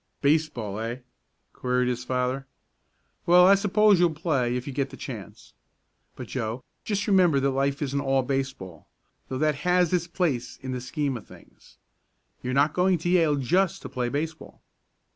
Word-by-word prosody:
"Baseball; 140 -9 0
eh?" 115 +2 -3 0.6
queried 125 0 0
his 125 -1 -2
father. 130 +1 -2 0.8
"Well, 180 +1 +7
I 195 - +7
suppose 205 0 +4
you'll 170 -3 +3
play 140 -7 0
if 125 0 -3
you 140 - -6
get 135 +1 -1
the - - -11
chance. - - -9 0.6
But, - - -8
Joe, 115 +4 -4 0.2
just 200 -2 -1
remember 180 -8 +4
that 135 0 +1
life 140 +2 0
isn't 140 0 -1
all 135 -1 +1
baseball, 130 -10 -4 0.4
though 130 - -3
that 150 0 +1
has 180 0 +2
its 175 -1 +1
place 150 -9 -2
in 130 - -4
the 125 -1 -3
scheme 140 0 -2
of 115 - -13
things. - - -18 0.6
You're 130 +1 -3
not 145 +3 +3
going 180 0 +2
to 170 +2 -3
Yale 165 -5 +3
just 170 +8 +1
to - - -6
play 125 -1 -2
baseball." 155 +1 -5
140 Hz, 170 wpm, -26 LUFS, 125-175 Hz, 0.8 s, Well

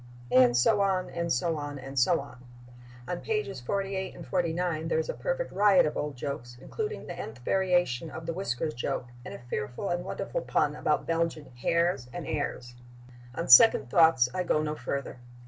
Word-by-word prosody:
And 125 -1 +5
so 205 - +3
on 190 -2 0
and 170 0 -2
so 165 +6 0
on 145 -1 -5
and 135 0 -4
so 170 +7 +3
on. 130 -2 -11 0.6
On 180 - -3
pages 425 - -3
48 195 +6 -3
and - - -9
49 170 -2 -1
there 160 - 0
is 160 - -1
a - - -1
perfect - - -3
riot 200 -2 +5
of 150 - -2
old 150 -1 -3
jokes, 120 -3 -6
including 435 - -5
the - - -6
nth 110 - -7
variation 175 -7 +1
of 160 +2 -8
the 165 - -2
whiskers 155 -3 -2
joke 120 0 -3
and - - -8
a 120 - -12
fearful 120 - -4
and 175 0 -1
wonderful - - -4
pun - - 0
about - - 0
Belgian 165 -4 -2
hares 170 0 0
and 175 +2 -6
heirs.... 125 -4 -4 0.6
On 165 - -3
second 130 - +7
thoughts 160 -7 +5
I 185 - -1
go 155 -3 +1
no 150 0 -2
further.... 140 -2 -5
160 Hz, 185 wpm, -28 LUFS, 130-180 Hz, 0.6 s, second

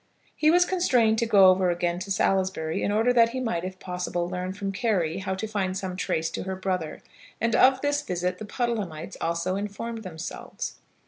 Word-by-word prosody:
He 305 - +3
was 355 +2 +5
constrained 250 -13 +2
to 235 - +1
go 195 -4 +7
over 185 -1 +2
again 175 0 0
to 190 +2 -6
Salisbury 190 -4 0
in - - 0
order 225 +4 +3
that 230 -1 +5
he 255 +2 -4
might, 225 -9 -1
if 185 0 -5
possible, 180 -1 -3
learn 180 +1 -3
from 195 0 -4
Carry 190 -5 0
how 190 0 -2
to 195 - -4
find 195 -3 -1
some 185 -2 -4
trace 165 -3 -1
to - - -4
her 190 0 -4
brother, 185 -4 -3 0.4
and 230 0 +1
of 260 0 +5
this 290 0 +1
visit 180 -6 -2
the 215 - -6
Puddlehamites 205 -9 -3
also 170 +2 -1
informed 210 +3 -4
themselves. 165 -6 -6
190 Hz, 195 wpm, -26 LUFS, 180-230 Hz, 0.4 s, go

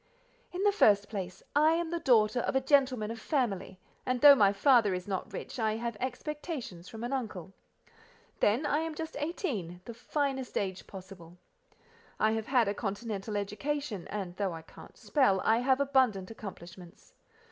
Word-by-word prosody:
"In 365 +2 -3
the 410 - +5
first 205 - +4
place: 185 -4 -6
I 305 +2 +5
am 335 0 -1
the 340 - -1
daughter 240 -6 +3
of 245 - -2
a - - +5
gentleman 260 -5 +2
of 230 - -7
family, 220 - -2 0.2
and 255 0 -1
though 285 +2 +10
my 205 -7 +5
father 210 -1 +4
is 180 +1 -6
not 190 -2 -3
rich, - - -7
I 220 -1 +1
have 235 0 -3
expectations 255 - -5
from 225 0 -8
an 245 +3 -3
uncle. 205 -8 -4 0.9
Then, 235 +9 +2
I 290 +1 +1
am 320 -1 -3
just 320 +1 -6
eighteen, 255 - -3
the 235 - -7
finest 265 +1 -2
age 190 -2 -3
possible. 185 -3 -11 0.8
I 215 - +3
have 220 0 -2
had 245 -5 +3
a 200 - 0
continental 210 0 -4
education, 215 +1 -3
and 190 -4 -5
though 195 -4 -1
I 165 -1 -8
can't - - -15
spell, 255 -10 +2
I 225 +1 +3
have 260 +2 +2
abundant 255 -9 +2
accomplishments. 180 -4 -11
225 Hz, 170 wpm, -30 LUFS, 195-275 Hz, 0.9 s, though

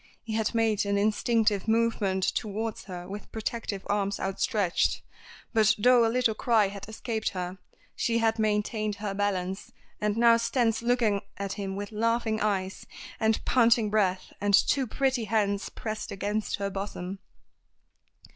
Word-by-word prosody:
He 225 - -5
had 220 +1 0
made 225 -2 +2
an 200 0 0
instinctive 215 0 +1
movement 220 -4 +1
towards 215 +2 -2
her 180 -2 -7
with 200 +2 -8
protective 220 -2 -4
arms 200 -1 0
outstretched; 195 -1 0 0.5
but 220 -2 +4
though 245 +3 +5
a 225 - +3
little 235 -1 +2
cry 215 -2 +2
had 200 +1 -8
escaped 220 0 -2
her, 180 0 -5 0.4
she 230 -1 +1
had 225 0 +1
maintained 215 0 0
her 205 -1 -4
balance, 190 -1 -2 0.3
and 210 0 0
now 235 0 +6
stands 230 -1 +1
looking 235 -4 +2 0.2
at 200 0 -3
him 195 -2 -4
with 205 +1 -5
laughing 225 0 0
eyes, 195 -2 -1 0.3
and 220 -1 +1
panting 230 -3 +4
breath, 190 -3 0
and 205 -1 +4
two 270 +4 +2
pretty 260 -1 0
hands 200 -2 0
pressed 215 -1 -5
against 205 +2 -2
her 200 0 -3
bosom. 195 -1 -5
215 Hz, 145 wpm, -28 LUFS, 200-225 Hz, 0.5 s, now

